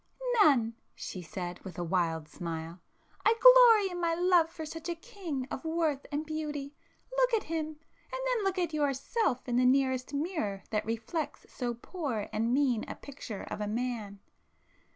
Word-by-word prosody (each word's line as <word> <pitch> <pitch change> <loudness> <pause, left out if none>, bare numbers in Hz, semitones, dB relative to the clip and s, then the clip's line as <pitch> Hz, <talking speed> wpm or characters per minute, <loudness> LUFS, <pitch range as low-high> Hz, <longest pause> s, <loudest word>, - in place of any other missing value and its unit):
"None!" 240 - +5 0.2
she 185 - -6
said, 175 +1 -6
with 185 -4 -9
a 175 - -2
wild 165 -3 0
smile—"I 170 - -3
glory 475 -6 +8
in 350 - -4
my 335 -1 +2
love 350 -2 +4
for 320 -1 -7
such 325 +2 -6
a 340 - -1
king 335 - -5
of - - -4
worth 320 -4 0
and 295 +2 -2
beauty! 300 -2 -4 0.4
Look - - +4
at 435 - 0
him!—and 320 -1 -2 0.6
then - - +1
look 390 -1 0
at 345 -3 0
yourself 280 - 0
in 245 -1 +1
the 250 - +4
nearest 260 -1 +2
mirror 280 - -2
that 215 -1 0
reflects 230 +8 -3
so 240 -2 -2
poor 240 - -4
and 225 +2 +1
mean 255 -4 +2
a - - -5
picture 260 -7 -8
of - - -6
a 210 - -1
man! 220 -2 -3
280 Hz, 165 wpm, -30 LUFS, 220-335 Hz, 0.6 s, glory